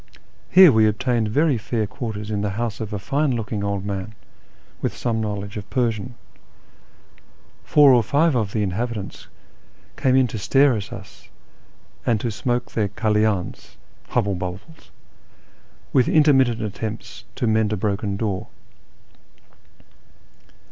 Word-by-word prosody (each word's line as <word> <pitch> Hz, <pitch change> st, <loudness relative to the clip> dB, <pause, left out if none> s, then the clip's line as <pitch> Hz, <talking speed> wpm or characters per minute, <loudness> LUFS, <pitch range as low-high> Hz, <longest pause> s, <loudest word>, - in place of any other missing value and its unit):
Here 185 Hz, -4 st, +8 dB
we 110 Hz, -2 st, +4 dB
obtained 110 Hz, +1 st, 0 dB
very 140 Hz, +3 st, +2 dB
fair 110 Hz, +1 st, -2 dB
quarters 110 Hz, -4 st, -6 dB
in 105 Hz, -1 st, -1 dB
the 105 Hz, -, -1 dB
house 115 Hz, -2 st, -2 dB
of 110 Hz, -2 st, -5 dB
a 105 Hz, -, -2 dB
fine 140 Hz, +6 st, 0 dB
looking 105 Hz, -2 st, -3 dB
old 100 Hz, -1 st, -2 dB
man, 100 Hz, +1 st, -5 dB, 0.7 s
with -, -, -2 dB
some 115 Hz, -2 st, -1 dB
knowledge 105 Hz, -1 st, -4 dB
of 100 Hz, -1 st, -8 dB
Persian. 120 Hz, -1 st, -1 dB, 1.5 s
Four 145 Hz, -3 st, +6 dB
or 120 Hz, -, +5 dB
five 145 Hz, +8 st, +2 dB
of 110 Hz, -5 st, 0 dB
the 105 Hz, -1 st, 0 dB
inhabitants 105 Hz, +1 st, -4 dB, 0.7 s
came 130 Hz, -1 st, +2 dB
in 130 Hz, -1 st, +5 dB
to 110 Hz, -, -5 dB
stare 135 Hz, +5 st, +4 dB
at 100 Hz, -3 st, -5 dB
us -, -, -11 dB, 0.7 s
and 115 Hz, -3 st, +1 dB
smoke 120 Hz, 0 st, -2 dB
their 105 Hz, -3 st, 0 dB
halydns 105 Hz, -4 st, -1 dB
(" -, -, -32 dB
hubble 100 Hz, 0 st, +2 dB
bubbles 95 Hz, -, -7 dB, 0.5 s
"), -, -, -33 dB
with 130 Hz, -2 st, +4 dB
intermittent 135 Hz, -7 st, +4 dB
attempts 110 Hz, +1 st, -6 dB
to -, -, -2 dB
mend 110 Hz, -1 st, +2 dB
a 105 Hz, -, -1 dB
broken 100 Hz, 0 st, -2 dB
door. 100 Hz, -3 st, -2 dB
110 Hz, 140 wpm, -22 LUFS, 105-125 Hz, 1.5 s, Here